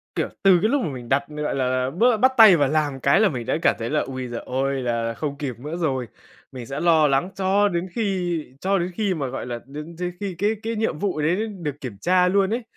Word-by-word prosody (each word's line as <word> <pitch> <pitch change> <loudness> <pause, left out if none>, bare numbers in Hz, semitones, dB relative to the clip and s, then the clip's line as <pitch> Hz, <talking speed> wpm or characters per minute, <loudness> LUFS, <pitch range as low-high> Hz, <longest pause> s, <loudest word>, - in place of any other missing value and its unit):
Kiểu, - - -1
từ 190 -2 +6
cái 215 - +2
lúc 280 +1 +1
mà 165 - -2
mình 125 -4 -8
đặt, 140 +1 +2
gọi 150 -1 -3
là, 130 -1 0
bớ 225 - +3
bắt 260 +4 +4
tay 215 -6 +9
vào 145 -3 +2
làm 145 -3 0
cái 140 +9 +3
là 215 -2 +4
mình 125 -5 -5
đã - - 0
cảm - - +3
thấy 115 - -3
là 150 - +1
ôi 130 -1 -4
giời 120 -1 -5
ơi, 135 +1 -1
là 115 -1 -1
không 145 +3 -4
kịp 135 -6 -5
nữa 150 +6 -5
rồi. 135 -8 -1 0.4
Mình 125 -2 -8
sẽ 135 +4 -5
lo 160 -3 +4
lắng 140 +6 +1
cho 195 +2 +2
đến 175 0 -2
khi 180 -7 -1 0.2
cho 195 +1 +1
đến 175 0 -2
khi 205 -2 0
mà 145 -6 -3
gọi 130 +1 -5
là 120 -1 -5
đến 150 +5 -9
đến 180 0 -3
khi 195 -3 -4
cái 205 +3 +1
cái 225 +1 -2
nhiệm 215 -8 -1
vụ 185 -7 -1
đấy 180 +9 +1
được 165 -9 -6
kiểm 120 -7 -7
tra 180 0 +3
luôn 195 +2 +2
ấy. 240 +1 -2
155 Hz, 260 wpm, -23 LUFS, 135-190 Hz, 0.4 s, tay